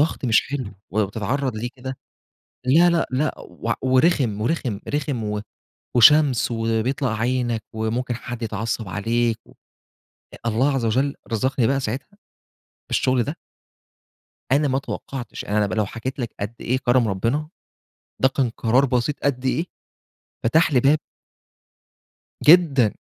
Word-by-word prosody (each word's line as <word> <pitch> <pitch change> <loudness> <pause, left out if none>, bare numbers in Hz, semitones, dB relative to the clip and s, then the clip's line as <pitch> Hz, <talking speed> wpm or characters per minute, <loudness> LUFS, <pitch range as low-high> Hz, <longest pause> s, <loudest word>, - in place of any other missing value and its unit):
ضغط 150 -2 0
مش 110 -2 +3
حلو، 130 -8 -4 0.2
ولمّا 105 -1 +1
بتتعرض 120 +5 -2
ليه 115 +3 -3
كده 130 +1 -6 0.7
لا، 165 +7 +6
لأ، 170 -1 +1
لأ، 150 +4 0
وع 115 0 -4
ورخم، 130 - +2
ورخم، 120 -5 -1
رخم 145 -5 -2
و 105 0 -2 0.6
وشمس 135 0 +6
وبيطلع 115 +2 -1
عينك، 120 -2 0
وممكن 115 +3 -2
حد 120 0 -6
يتعصب 110 -1 -3
عليك 115 +4 0
و - - -18 0.9
الله 125 +6 +2
عز 125 -3 -1
وجل 130 +5 +1 0.2
رزقني 125 +1 +1
بقى 135 0 +1
ساعتها 130 - -5 0.7
بالشغل 130 -2 +2
ده. 145 +6 -4 1.2
أنا 145 +2 +3
ما 130 - +1
اتوقعتش، 135 -3 -5
أنا 105 +1 +1
لم 100 - -3
لو 110 -2 +1
حكيت 120 +7 -6
لَك 120 -4 -4
قد 105 +3 -4
إيه 130 +2 0
كرم 120 -2 +2
ربنا، 115 +10 -1 0.7
ده 130 - +6
كان 130 -2 0
قرار 120 +3 +2
بسيط 125 +3 -1
قد 130 -2 0
إيه، 155 +6 0 0.8
فتح 155 +6 +3
لي 125 - +4
باب. 145 +4 +4 1.5
جدًا، 145 - +6
125 Hz, 140 wpm, -22 LUFS, 115-140 Hz, 1.5 s, لا